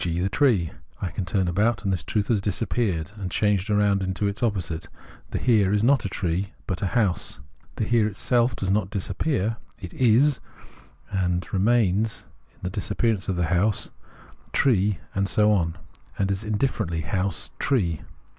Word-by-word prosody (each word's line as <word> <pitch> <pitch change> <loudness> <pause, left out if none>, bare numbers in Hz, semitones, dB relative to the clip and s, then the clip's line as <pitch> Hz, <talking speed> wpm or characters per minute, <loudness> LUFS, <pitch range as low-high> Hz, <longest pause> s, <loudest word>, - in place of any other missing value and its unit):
g. 85 -1 -1
the 95 +2 +1
tree. 105 - +2 0.3
I 90 - -3
turn 90 +2 -1
about 110 +6 +1
and 95 -2 +1
this 85 -5 -2
truth 105 +2 -1
has 110 -4 +2
disappeared 95 -4 -1
and 100 -4 -6
has - - -1
changed 105 -1 +1
round 105 -1 +3
into 95 +1 -1
its 100 0 -4
opposite: 90 -8 -1 0.4
the - - -2
Here 105 -6 +3
is 105 0 +2
not 135 0 +4
a - - -1
tree, 95 +2 -2
but 95 -3 -3
a 100 - +1
house. 100 -6 0 0.4
The - - -1
Here 110 0 +3
itself 120 +4 +1
does 95 -1 -1
not 100 -2 +1
disappear; 100 - -1 0.2
it 90 -4 -8
is 130 +4 +4 0.7
and 90 -2 0
remains 105 0 +2 0.3
in - - -29
the 90 - -2
disappearance 105 0 -1
of 95 - 0
the 90 -1 +1
house, 100 +4 +1 0.6
tree, 105 -7 +3 0.2
and 100 0 0
so 105 +2 +4
on, 85 -4 +1 0.4
and 100 0 +1
is 95 +2 -2
indifferently 105 -6 -1
house, 90 +3 -2
tree. 90 - +1
100 Hz, 170 wpm, -25 LUFS, 90-110 Hz, 0.7 s, not